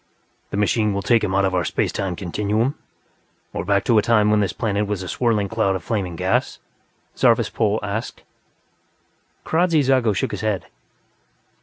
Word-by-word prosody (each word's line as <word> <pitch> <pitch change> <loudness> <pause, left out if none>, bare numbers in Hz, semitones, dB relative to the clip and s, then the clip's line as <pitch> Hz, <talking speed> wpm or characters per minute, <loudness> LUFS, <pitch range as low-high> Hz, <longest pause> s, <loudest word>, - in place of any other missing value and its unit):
"The - - -4
machine 105 0 +1
will 100 - -2
take 115 -2 +3
him 95 -2 -1
out 100 0 +3
of 95 - 0
our 90 -1 +1
space - - -1
time 95 -3 -3
continuum, 105 +7 -1 0.8
or - - -3
back 100 +1 +1
to 115 -3 +4
a - - +3
time 105 -1 +3
when 105 - +3
this 100 -3 0
planet 105 -3 -1
was 100 -2 -3
a - - -7
swirling 110 -1 0
cloud 105 -3 0
of 90 - -5
flaming 95 -5 -2
gas?" - - 0 0.6
Zarvas - - +3
Pol 110 0 +1
asked. 100 +3 -4 1.2
Kradzy 165 -1 +2
Zago 130 -6 +2
shook - - -1
his 105 - -5
head. 105 -5 -1
105 Hz, 175 wpm, -21 LUFS, 100-115 Hz, 1.2 s, to